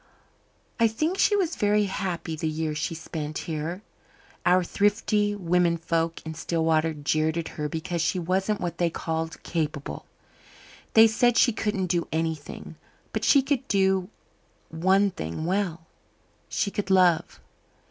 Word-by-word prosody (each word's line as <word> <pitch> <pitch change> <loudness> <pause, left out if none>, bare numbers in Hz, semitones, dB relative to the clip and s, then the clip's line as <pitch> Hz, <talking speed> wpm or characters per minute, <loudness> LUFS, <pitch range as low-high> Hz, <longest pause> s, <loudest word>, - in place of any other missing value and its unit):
"I 230 - +5
think 310 - -1
she 415 - +4
was 360 -5 0
very 210 0 +2
happy 180 -4 -3
the 160 +1 -2
year 155 0 -2
she 155 +2 -3
spent 155 -1 -5
here. 165 +5 -4 0.6
Our 180 +1 +5
thrifty 205 +2 +1
women 175 -2 +2
folk 165 0 -2
in 160 - -5
Stillwater 160 0 0
jeered 155 +2 0
at 165 - -3
her 150 -1 -4
because 165 +2 -3
she 165 +3 +1
wasn't 190 +4 0
what 170 -3 -4
they 175 -1 +2
called 160 0 -4
capable. 150 -4 -3 0.9
They 220 0 +9
said 230 +2 +3
she 245 - +5
couldn't 210 -3 -1
do 175 -1 0
anything. 160 -2 -4 0.4
But - - -2
she 280 -2 +5
could 270 -1 -1
do 190 -1 +2 0.6
one 190 +5 +2
thing 85 - -5
well 180 -3 -1 0.6
she 200 - -1
could 200 -1 -3
love. 180 -4 +3
175 Hz, 145 wpm, -26 LUFS, 160-205 Hz, 0.9 s, They